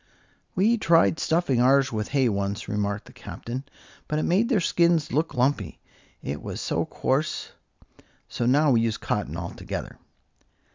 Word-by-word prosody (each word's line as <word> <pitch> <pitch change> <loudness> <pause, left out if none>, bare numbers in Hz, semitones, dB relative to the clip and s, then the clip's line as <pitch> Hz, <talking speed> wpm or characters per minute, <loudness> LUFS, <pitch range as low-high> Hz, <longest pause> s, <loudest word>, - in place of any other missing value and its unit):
"We 220 +5 +3
tried 165 -3 +4
stuffing 160 -7 +1
ours 135 +1 +4
with 110 -2 -2
hay 135 -3 +2
once," 100 0 -2
remarked 105 0 -2
the - - -15
Captain; 125 +3 -7 0.4
"but 150 - -1
it 155 - 0
made 205 +7 +2
their 235 -6 +3
skins 170 -2 +2
look 155 +5 0
lumpy, 125 - 0 0.4
it 70 +1 -4
was - - -6
so - - -1
coarse; - - -1 0.8
so 120 - -2
now 145 +3 +4
we 115 -3 +4
use 115 -1 0
cotton - - -3
altogether." - - -6
135 Hz, 150 wpm, -25 LUFS, 110-165 Hz, 0.8 s, tried